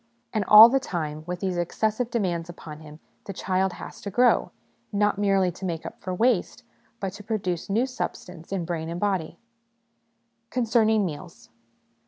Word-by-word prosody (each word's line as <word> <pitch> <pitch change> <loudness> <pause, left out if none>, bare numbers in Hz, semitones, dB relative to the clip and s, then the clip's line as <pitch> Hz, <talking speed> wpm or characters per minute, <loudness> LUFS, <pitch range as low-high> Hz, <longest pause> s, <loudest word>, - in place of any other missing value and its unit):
And 215 -3 +1
all 215 +3 +11
the 270 +3 +2
time, 155 - -4
with 180 0 -4
these 185 -2 -1
excessive 220 +7 -1
demands 180 -7 -2
upon 155 -3 -9
him, 155 0 -13 0.3
the 195 - -6
child 190 0 0
has - - -10
to 200 - -5
grow! 245 +5 +3 0.4
not 205 -1 +1
merely 195 -3 +2
to 180 +3 -13
make 170 -3 -3
up - - -9
for 185 - -4
waste, 225 +3 +1 0.4
but 195 -2 -3
to 210 +1 -10
produce 190 -6 -3
new 225 +6 +2
substance 180 -9 -6
in 190 -4 -2
brain 165 -1 -3
and 170 +1 -4
body. 190 -5 -1 1.1
Concerning 220 -3 +2
Meals. 170 +1 -8
190 Hz, 165 wpm, -25 LUFS, 175-215 Hz, 1.1 s, all